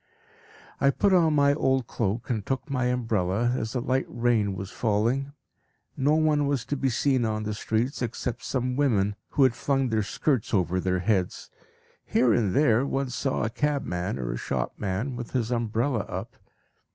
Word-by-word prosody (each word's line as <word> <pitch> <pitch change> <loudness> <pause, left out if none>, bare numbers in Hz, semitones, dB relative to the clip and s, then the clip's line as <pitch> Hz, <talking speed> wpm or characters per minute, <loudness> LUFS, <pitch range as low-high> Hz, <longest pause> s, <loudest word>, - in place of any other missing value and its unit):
I 140 - +4
put 195 +7 +2
on 165 -4 +4
my 140 -1 +4
old 130 -3 +1
cloak, 115 +2 -2
and 110 -4 -1
took 135 +5 -3
my 125 -2 0
umbrella, 115 -2 0
as 110 -2 -3
a - - +1
light 130 +1 0
rain 115 -5 +1
was 95 0 -6
falling. 120 +6 0 0.6
No 145 +3 +2
one 155 -2 +2
was 140 -5 -1
to 145 - -2
be 135 -1 0
seen 130 +1 +1
on 110 -1 -1
the 105 0 -2
streets 110 +5 -1
except 120 0 -3
some 125 -1 -1
women, 105 -8 +2
who 140 - +2
had 130 -3 +4
flung 135 +1 0
their 110 -1 +1
skirts 115 +2 0
over 90 -1 +1
their 90 0 0
heads. 95 -2 -1 0.5
Here 120 -3 +3
and 105 -4 +1
there 125 -4 +4
one 135 -1 -2
saw 130 +3 -1
a 115 - -1
cabman 125 -9 -1
or 60 -2 -3
a - - -3
shopman 95 - -3
with 120 -1 -7
his 120 -2 0
umbrella 115 +2 0
up. 95 +2 -6
120 Hz, 175 wpm, -26 LUFS, 105-135 Hz, 0.6 s, I